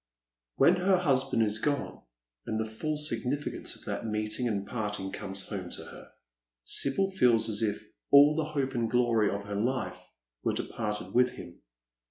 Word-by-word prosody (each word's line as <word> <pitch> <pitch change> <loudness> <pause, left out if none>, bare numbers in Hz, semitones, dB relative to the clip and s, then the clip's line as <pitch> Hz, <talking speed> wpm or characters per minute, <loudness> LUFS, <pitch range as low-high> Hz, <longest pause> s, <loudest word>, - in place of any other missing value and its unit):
When 170 +7 +5
her 185 +1 +3
husband 135 -8 +2
is 105 0 -1
gone, 145 +3 -2 0.5
and 110 - -1
the 110 - 0
full 150 +8 -3
significance 140 0 -1
of - - -13
that - - -3
meeting 110 +2 -1
and 100 -3 -1
parting 105 -4 -4
comes 95 -1 -6
home 95 -4 -6
to - - -6
her, - - -12 0.6
Sibyl 190 - +2
feels 120 -11 +4
as 105 -1 0
if 105 -2 0 0.3
all 145 +2 +8
the 160 -1 0
hope 140 -3 -2
and 115 -3 0
glory 115 -3 +3
of 100 0 -3
her 100 0 -5
lifo 125 +5 -1 0.4
were - - +1
departed 105 -1 -4
with 125 +1 +4
him. 85 -7 -11
115 Hz, 170 wpm, -29 LUFS, 105-140 Hz, 0.6 s, all